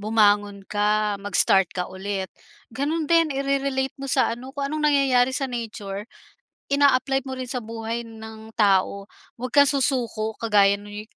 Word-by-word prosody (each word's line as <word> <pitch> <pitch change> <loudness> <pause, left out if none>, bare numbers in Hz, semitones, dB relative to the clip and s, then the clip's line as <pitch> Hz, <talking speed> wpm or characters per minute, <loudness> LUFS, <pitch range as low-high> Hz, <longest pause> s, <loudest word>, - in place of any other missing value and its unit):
bumangon 205 -2 +2
ka, 210 0 0
mag-start 195 -2 +2
ka 180 -1 -3
ulit. 190 0 -4 0.4
Ganun 300 +6 -1
din, 330 0 +3
ire-relate 275 -1 -1
mo 275 - -5
sa 250 - +2
ano, 245 +3 -8
kung 280 - -2
anong 305 0 0
nangyayari 260 -3 +3
sa 275 - -1
nature, 210 -4 -5 0.7
ina-apply 270 -1 +3
mo 260 - -4
rin 255 -1 -6
sa 255 - -2
buhay 230 +1 -5
ng 220 0 -11
tao. 200 -1 +2 0.3
Huwag 250 +1 -5
kang 285 -1 +6
susuko 250 -6 0
kagaya 200 -3 +4
ng 205 +1 -8
230 Hz, 150 wpm, -24 LUFS, 205-270 Hz, 0.7 s, kang